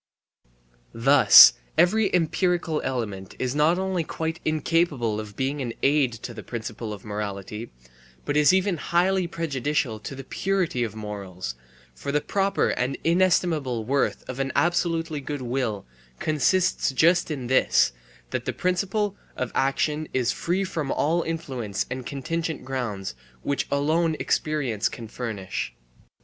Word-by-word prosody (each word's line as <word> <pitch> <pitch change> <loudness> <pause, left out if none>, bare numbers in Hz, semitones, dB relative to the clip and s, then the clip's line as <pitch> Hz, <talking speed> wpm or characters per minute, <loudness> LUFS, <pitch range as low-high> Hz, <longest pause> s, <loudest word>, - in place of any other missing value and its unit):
Thus 125 -1 +9 0.2
every 205 +3 +4
empirical 175 -1 +1
element 105 -7 -4
is 130 0 -1
not 150 +4 +3
only 190 -2 -1
quite 160 +1 -4
incapable 155 -8 +1
of 105 -1 -8
being 135 +2 -1
an 120 -3 -3
aid 140 -2 +3
to 120 - -5
the 110 - -8
principle 115 -1 -6
of 105 -3 -8
morality, 105 +1 -5 0.5
but - - -1
is 150 +3 +6
even 190 -1 +2
highly 180 +3 +1
prejudicial 145 - -1
to 125 +6 -7
the 135 - -7
purity 185 -5 -1
of 110 -2 -4
morals, 100 - -6 0.4
for 100 - -5
the 150 - +2
proper 195 +6 0
and 130 +2 -1
inestimable 165 -9 +2
worth 140 +4 0
of 130 +1 -6
an 135 -1 -1
absolutely 165 -3 +1
good 145 -1 -5
will 120 -5 -2 0.3
consists 155 +5 +1
just 170 +7 +3
in 140 -5 -4
this, 130 - +3 0.4
that - - -3
the - - -2
principle 195 +3 0 0.2
of 130 - -2
action 150 +3 0
is 125 -2 +2
free 180 +3 -1
from 160 -7 -3
all 165 +4 +1
influence 130 -12 -3
of 125 0 -4
contingent 160 +2 -3
grounds, 115 - -3 0.3
which 140 - -1
alone 155 +3 +1
experience 135 -8 0
can 115 - -8
furnish. 110 -5 -4
140 Hz, 140 wpm, -25 LUFS, 120-170 Hz, 0.5 s, Thus